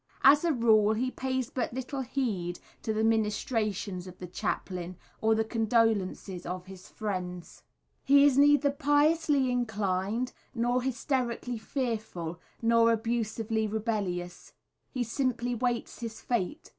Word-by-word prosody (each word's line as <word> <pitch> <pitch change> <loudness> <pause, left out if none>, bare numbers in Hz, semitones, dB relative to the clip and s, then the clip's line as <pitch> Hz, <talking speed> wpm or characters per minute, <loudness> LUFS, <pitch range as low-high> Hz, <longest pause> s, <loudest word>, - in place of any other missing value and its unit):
As 290 +3 +7
a 340 - +3
rule, 220 -5 +4
he 255 +4 -1
pays 260 -2 -2
but 245 -2 -2
little 260 +1 -3
heed 210 -10 -2 0.2
to 220 - -2
the 220 0 0
ministrations 210 -3 0
of 180 0 -11
the 180 - -7
chaplain, 180 0 -4 0.2
or 220 0 +4
the 220 - +2
condolences 220 -5 0
of 180 0 -5
his 190 -1 -11
friends. 180 -4 -5 0.4
He 280 +1 +6
is 285 -3 +5
neither 290 0 +5
piously 290 -1 +2
inclined, 220 0 -1 0.2
nor 245 +2 +1
hysterically 250 -2 -2
fearful, 220 - -3 0.2
nor 230 0 +5
abusively 225 -1 -1
rebellious 205 -5 -3 0.4
he 250 -3 -2
simply 245 0 -1
waits 240 0 -2
his 230 -2 -6
fate. 240 - -2
225 Hz, 130 wpm, -29 LUFS, 205-255 Hz, 0.4 s, As